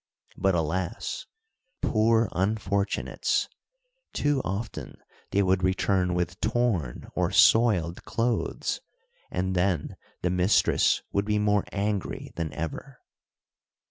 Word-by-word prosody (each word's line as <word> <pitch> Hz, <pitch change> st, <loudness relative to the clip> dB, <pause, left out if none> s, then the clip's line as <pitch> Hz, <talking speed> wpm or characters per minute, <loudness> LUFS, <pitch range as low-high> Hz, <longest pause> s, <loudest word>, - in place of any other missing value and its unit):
But 95 Hz, -2 st, +2 dB
alas! 90 Hz, +5 st, -2 dB, 0.6 s
poor 115 Hz, +1 st, +3 dB
unfortunates! 100 Hz, +1 st, 0 dB, 0.7 s
too 145 Hz, -2 st, +1 dB
often 100 Hz, +5 st, -5 dB, 0.3 s
they 100 Hz, -, +2 dB
would 95 Hz, 0 st, +2 dB
return 95 Hz, -1 st, +1 dB
with 90 Hz, -1 st, -2 dB
torn 110 Hz, -, 0 dB
or -, -, +1 dB
soiled 95 Hz, -8 st, +4 dB
clothes, 115 Hz, 0 st, -1 dB, 0.5 s
and 95 Hz, +1 st, -1 dB
then 90 Hz, -3 st, 0 dB, 0.3 s
the 90 Hz, -, +1 dB
mistress 90 Hz, +3 st, +3 dB
would 100 Hz, 0 st, 0 dB
be 105 Hz, 0 st, +1 dB
more 105 Hz, -1 st, +2 dB
angry 100 Hz, -1 st, -2 dB
than 80 Hz, -3 st, -3 dB
ever. 125 Hz, -, -5 dB
100 Hz, 105 wpm, -27 LUFS, 90-110 Hz, 0.7 s, soiled